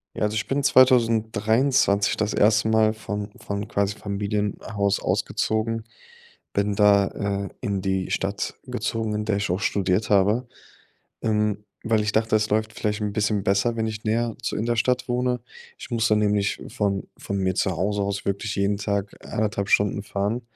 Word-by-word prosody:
Ja, -, -, -2 dB
also 105 Hz, +1 st, 0 dB
ich 110 Hz, -, -1 dB
bin 140 Hz, +1 st, 0 dB
2023 115 Hz, -3 st, +3 dB
das 105 Hz, 0 st, 0 dB
1. 110 Hz, +1 st, +4 dB
Mal 110 Hz, 0 st, +4 dB
von 105 Hz, -1 st, -5 dB
von, 100 Hz, +1 st, -4 dB
quasi, 100 Hz, 0 st, 0 dB
Familienhaus 100 Hz, 0 st, -1 dB
ausgezogen. 110 Hz, +1 st, -1 dB, 0.7 s
Bin 100 Hz, 0 st, 0 dB
da, 100 Hz, -1 st, +5 dB
äh, 100 Hz, 0 st, -3 dB
in 100 Hz, -5 st, -1 dB
die 95 Hz, -1 st, -1 dB
Stadt 100 Hz, +1 st, -2 dB
gezogen, 110 Hz, -1 st, -2 dB
in 105 Hz, 0 st, -2 dB
der 105 Hz, -1 st, 0 dB
ich 100 Hz, +1 st, -1 dB
auch 90 Hz, +2 st, 0 dB
studiert 100 Hz, +1 st, 0 dB
habe. 105 Hz, +5 st, +3 dB, 0.8 s
Ähm, 105 Hz, -1 st, 0 dB, 0.2 s
weil 110 Hz, -1 st, +2 dB
ich 105 Hz, -, 0 dB
dachte, 110 Hz, 0 st, +2 dB
es 110 Hz, 0 st, +1 dB
läuft 110 Hz, +1 st, 0 dB
vielleicht 105 Hz, -1 st, -2 dB
'n 105 Hz, -1 st, -2 dB
bisschen 105 Hz, -1 st, 0 dB
besser, 100 Hz, +5 st, +1 dB
wenn 110 Hz, 0 st, 0 dB
ich 110 Hz, -1 st, -5 dB
näher 115 Hz, +1 st, 0 dB
zu -, -, -2 dB
in 110 Hz, -, -1 dB
der 120 Hz, 0 st, +1 dB
Stadt 125 Hz, +3 st, +1 dB
wohne. 125 Hz, 0 st, 0 dB, 0.4 s
Ich -, -, -10 dB
muss 115 Hz, -2 st, +1 dB
da 110 Hz, -, +4 dB
nämlich 105 Hz, -1 st, +1 dB
von 100 Hz, -4 st, -1 dB
von 100 Hz, -, -4 dB
mir 95 Hz, -1 st, 0 dB
zu 95 Hz, -, +1 dB
Hause 100 Hz, +4 st, -1 dB
aus 100 Hz, 0 st, -3 dB
wirklich 100 Hz, +1 st, -2 dB
jeden 100 Hz, +1 st, +1 dB
Tag 100 Hz, -1 st, -2 dB
1,5 105 Hz, -2 st, -2 dB
Stunden 100 Hz, 0 st, +2 dB
fahren, 100 Hz, +4 st, -2 dB
105 Hz, 175 wpm, -24 LUFS, 100-110 Hz, 0.8 s, da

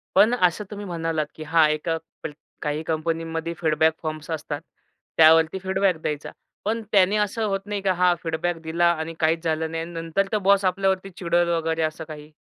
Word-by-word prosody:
पण 230 Hz, +4 st, +6 dB
असं 185 Hz, -1 st, +1 dB
तुम्ही 205 Hz, 0 st, -6 dB
म्हणालात 165 Hz, -3 st, -2 dB
की 155 Hz, -, -9 dB
"हां 160 Hz, 0 st, +4 dB
एका 165 Hz, +2 st, -1 dB, 0.3 s
प -, -, -3 dB, 0.3 s
काही 150 Hz, +1 st, -2 dB
कंपनीमध्ये 165 Hz, +1 st, -2 dB
फीडबॅक 160 Hz, 0 st, +3 dB
फॉर्म्स 155 Hz, 0 st, -5 dB
असतात. 155 Hz, -2 st, -4 dB, 0.6 s
त्यावरती 160 Hz, +2 st, +6 dB
फीडबॅक 190 Hz, -1 st, +1 dB
द्यायचा." 150 Hz, -1 st, -3 dB, 0.3 s
पण 225 Hz, +3 st, -1 dB
त्याने 200 Hz, +1 st, +4 dB
असं 210 Hz, +2 st, 0 dB
होत 195 Hz, -1 st, -1 dB
नाही 205 Hz, -1 st, -3 dB
की 195 Hz, -, 0 dB
हा 180 Hz, -1 st, +4 dB
फीडबॅक 165 Hz, +1 st, -2 dB
दिला 170 Hz, +2 st, +2 dB
आणि 160 Hz, 0 st, -4 dB
काहीच 160 Hz, +1 st, +1 dB
झालं 160 Hz, 0 st, -1 dB
नाही 165 Hz, 0 st, -3 dB
आणि 170 Hz, +1 st, -8 dB
नंतर 165 Hz, +4 st, -1 dB
तर 215 Hz, -, +2 dB
बॉस 200 Hz, 0 st, +5 dB
आपल्यावरती 190 Hz, +1 st, 0 dB
चिडेल 175 Hz, -1 st, +1 dB
वगैरे 165 Hz, -1 st, 0 dB
असं 155 Hz, +1 st, -2 dB
काही? 150 Hz, -1 st, -9 dB
165 Hz, 185 wpm, -24 LUFS, 160-190 Hz, 0.6 s, पण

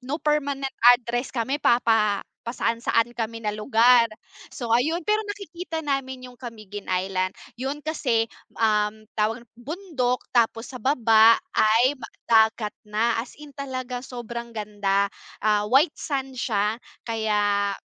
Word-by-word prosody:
no 265 Hz, +4 st, -3 dB
permanent 285 Hz, -3 st, -1 dB, 0.2 s
address 240 Hz, +1 st, -3 dB
kami, 265 Hz, +4 st, -2 dB
papa 225 Hz, -4 st, +3 dB, 0.2 s
pa-saan-saan 230 Hz, 0 st, 0 dB
kami 230 Hz, -1 st, -5 dB
na 210 Hz, -, 0 dB
lugar. 230 Hz, +2 st, +4 dB, 0.4 s
So 235 Hz, -5 st, -4 dB
ayun, 315 Hz, +8 st, +1 dB
pero 425 Hz, +1 st, +2 dB
nakikita 350 Hz, -5 st, -6 dB
namin 265 Hz, -2 st, -3 dB
yung 245 Hz, -, -21 dB
Camiguin 215 Hz, -5 st, -9 dB
Island. 185 Hz, 0 st, -1 dB, 0.2 s
Yun 280 Hz, +3 st, -4 dB
kasi, 250 Hz, -8 st, +1 dB, 0.3 s
um, 215 Hz, -1 st, +1 dB
tawag 225 Hz, +2 st, -1 dB
bundok 260 Hz, -1 st, -3 dB
tapos 230 Hz, -1 st, +2 dB
sa 255 Hz, -, -8 dB
baba 225 Hz, -3 st, +5 dB, 0.2 s
ay 230 Hz, +5 st, +4 dB, 0.3 s
dagat 220 Hz, -1 st, +3 dB, 0.2 s
na. 225 Hz, +2 st, +1 dB
As 245 Hz, -, -10 dB
in 295 Hz, -1 st, -12 dB
talagang 255 Hz, -2 st, -5 dB
sobrang 235 Hz, -2 st, -7 dB
ganda. 200 Hz, -1 st, 0 dB, 0.3 s
Ah, 210 Hz, -1 st, +2 dB
white 285 Hz, +6 st, +4 dB
sand 265 Hz, -3 st, -4 dB
siya 215 Hz, -1 st, 0 dB, 0.2 s
kaya 205 Hz, -3 st, 0 dB
235 Hz, 125 wpm, -24 LUFS, 215-265 Hz, 0.4 s, baba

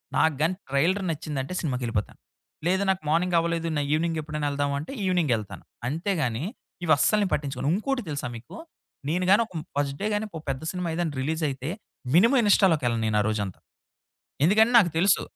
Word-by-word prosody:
నాకుగాని 160 Hz, +3 st, +2 dB
trailer 170 Hz, +9 st, +2 dB
నచ్చిందంటే 150 Hz, 0 st, -4 dB
సినిమాకెళ్ళిపోతా. 125 Hz, -, -2 dB, 0.5 s
లేదు 190 Hz, +3 st, +2 dB
నాకు 190 Hz, -1 st, +1 dB
మార్నింగ్ 175 Hz, +3 st, +2 dB
అవ్వలేదు 165 Hz, 0 st, 0 dB
నా 145 Hz, -, +1 dB
ఈవినింగ్ 165 Hz, +1 st, 0 dB
ఎప్పుడైనా 150 Hz, -1 st, -3 dB
వెళ్దామా 140 Hz, 0 st, -1 dB
అంటే 155 Hz, -, -7 dB
ఈవినింగ్ 175 Hz, -7 st, +1 dB
ఎళ్తాను. 105 Hz, -2 st, -8 dB, 0.2 s
అంతేగాని, 155 Hz, -, -1 dB, 0.4 s
ఇవి 160 Hz, -2 st, +4 dB
అస్సలు 215 Hz, +8 st, +3 dB
నేను 190 Hz, -, -2 dB
పట్టించుకోను. 140 Hz, -1 st, -1 dB
ఇంకోటి 260 Hz, +5 st, -1 dB
తెలుసా 145 Hz, -3 st, -3 dB
మీకు? 120 Hz, -, -12 dB, 0.5 s
నేనుగాని 185 Hz, +6 st, +3 dB
ఒక -, -, -20 dB, 0.2 s
ఫస్ట్ 140 Hz, -1 st, 0 dB
డే 205 Hz, -, -1 dB
గాని 210 Hz, +1 st, 0 dB
ఒక 160 Hz, -2 st, -7 dB
పెద్ద 130 Hz, +1 st, -2 dB
సినిమా 180 Hz, -2 st, -3 dB
ఏదైనా 170 Hz, -3 st, -1 dB
రిలీజ్ 160 Hz, +4 st, -2 dB
అయితే 135 Hz, +2 st, -5 dB, 0.5 s
మినిమం 230 Hz, +10 st, +6 dB
ఇన్‌స్టాలోకి 190 Hz, -7 st, +4 dB
వెళ్ళను 115 Hz, -2 st, 0 dB
నేను 105 Hz, -1 st, +1 dB
ఆ -, -, 0 dB
రోజంతా. 100 Hz, -4 st, -3 dB, 0.9 s
ఎందుకంటే 220 Hz, +7 st, +5 dB
నాకు 180 Hz, -6 st, +4 dB
తెలుసు. 190 Hz, +4 st, +4 dB
160 Hz, 170 wpm, -26 LUFS, 140-185 Hz, 0.9 s, మినిమం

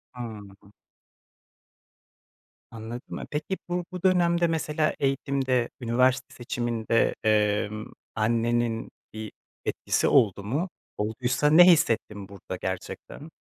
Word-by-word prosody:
Hımm. 105 Hz, -4 st, -9 dB, 2.0 s
Anladım. 115 Hz, +2 st, -7 dB
E, -, -, -6 dB
peki, 155 Hz, +6 st, -2 dB
bu 175 Hz, 0 st, -1 dB
bu 180 Hz, -1 st, -7 dB
dönemde 175 Hz, -2 st, +3 dB
mesela 155 Hz, -1 st, 0 dB
eğitimde, 135 Hz, -2 st, 0 dB
üniversite 125 Hz, +2 st, +1 dB
seçiminde, 120 Hz, -2 st, 0 dB
emm, 105 Hz, 0 st, +1 dB, 0.3 s
annenin 115 Hz, +1 st, 0 dB, 0.2 s
bir 110 Hz, -1 st, -6 dB, 0.3 s
etkisi -, -, 0 dB
oldu 105 Hz, -7 st, +3 dB
mu? 145 Hz, -, -1 dB, 0.3 s
Olduysa 125 Hz, +7 st, 0 dB
ne 165 Hz, +4 st, +9 dB
hissettin 115 Hz, -, +2 dB
burada 95 Hz, -2 st, -7 dB
gerçekten? 95 Hz, -, -6 dB
120 Hz, 100 wpm, -26 LUFS, 110-150 Hz, 2.0 s, ne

